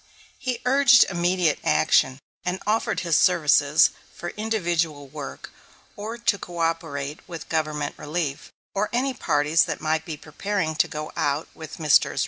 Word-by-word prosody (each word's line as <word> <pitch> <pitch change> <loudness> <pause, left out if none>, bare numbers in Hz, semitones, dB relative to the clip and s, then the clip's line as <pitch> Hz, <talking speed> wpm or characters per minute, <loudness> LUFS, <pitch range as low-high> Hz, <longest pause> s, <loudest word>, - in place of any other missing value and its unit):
He 250 -2 -3
urged 255 -2 +6
immediate 175 -2 +1
action, 80 +12 +3 0.3
and 180 +1 -2
offered 215 +2 0
his 170 -3 +1
services 150 -4 +4 0.2
for 175 - -5
individual 170 -9 -1
work, 145 0 -8 0.4
or 220 +3 -6
to 230 -4 +1
coöperate 165 -4 -3
with 165 -2 -8
Government 155 -2 -1
relief, 150 -2 -3 0.2
or 205 +1 0
any 260 +3 0
parties 150 -7 +2
that - - -4
might 155 0 0
be 160 -2 -6
preparing 160 +2 -3
to - - +3
go 150 0 -6
out 145 +2 -1
with 160 +3 -9
Messrs. 155 -3 +3
165 Hz, 140 wpm, -24 LUFS, 150-200 Hz, 0.4 s, urged